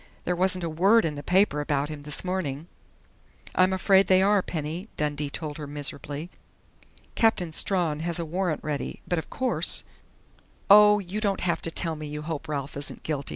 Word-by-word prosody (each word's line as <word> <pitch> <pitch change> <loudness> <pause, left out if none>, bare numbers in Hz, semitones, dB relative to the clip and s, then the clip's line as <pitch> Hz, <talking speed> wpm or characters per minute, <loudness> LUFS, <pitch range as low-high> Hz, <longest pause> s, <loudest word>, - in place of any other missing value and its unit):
There 180 - 0
wasn't 185 0 +1
a - - -1
word 195 +8 +4
in 155 - -1
the 145 - -6
paper 180 -3 +2
about 145 0 -1
him 150 -2 -7
this 150 +4 -1
morning 170 -6 -3 0.5
" - - -24
"I'm 185 +1 +4
afraid 190 0 +4
they 185 0 +5
are, 205 0 +4
Penny," 165 +3 -5
Dundee 150 -1 -2
told 150 0 -5
her 150 - -6
miserably. 145 +3 -3 0.8
"Captain 185 -7 +2
Strawn 165 -3 +1
has 170 +1 -2
a 170 - -2
warrant 175 0 -2
ready, 150 -2 -4
but 175 - 0
of - - -9
course 260 -1 0 0.4
" - - -33
"Oh, 210 0 +8
you 200 +2 -4
don't 200 -3 0
have 170 -2 0
to - - -1
tell 165 0 -2
me 155 0 -7
you 150 +1 -6
hope 160 0 -5
Ralph 140 -2 -4
isn't 140 - -3
guilty!" 145 -3 -2
165 Hz, 195 wpm, -26 LUFS, 150-185 Hz, 0.8 s, Oh